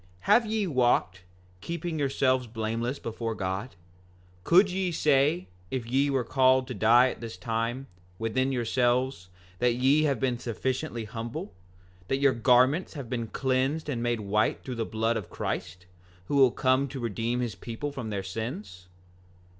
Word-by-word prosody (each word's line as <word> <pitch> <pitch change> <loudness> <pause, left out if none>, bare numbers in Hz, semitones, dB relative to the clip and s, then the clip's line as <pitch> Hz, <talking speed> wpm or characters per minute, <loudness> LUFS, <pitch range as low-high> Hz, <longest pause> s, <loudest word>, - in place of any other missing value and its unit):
5:27 90 - -29
Have 235 - +4
ye 215 -1 0
walked, 120 - +1 0.4
keeping 170 -1 -4
yourselves 130 -2 +1
blameless 115 +3 -2
before 115 -2 -4
God? 95 +6 -4 0.7
Could 185 - +5
ye 185 -1 -1
say, 150 +2 +2 0.2
if 130 -3 -3
ye 135 +4 +1
were 135 -2 +1
called 130 +2 +3
to 130 - -4
die 120 +3 +5
at - - -10
this 115 -1 -7
time, 115 +3 -2 0.3
within 130 +4 0
yourselves, 125 -4 0 0.3
that 120 -1 +2
ye 135 +5 +3
have 140 -5 +1
been 125 -3 0
sufficiently 125 +1 -3
humble? 120 - -6 0.5
That 135 - +1
your 140 -1 +3
garments 130 +9 +3
have 135 -5 -7
been 115 -2 -2
cleansed 135 +6 -1
and 120 -5 -2
made 120 -2 0
white 105 +2 0
through 130 - -5
the - - 0
blood 110 +1 0
of 105 - -6
Christ, 90 0 -4 0.4
who 145 - -2
will 135 -2 +6
come 130 +3 +1
to 135 0 -7
redeem 115 +1 -2
his 120 -3 -2
people 120 +5 -5
from 130 -6 -5
their 100 -2 -3
sins? 110 - -6
125 Hz, 160 wpm, -28 LUFS, 115-135 Hz, 0.7 s, will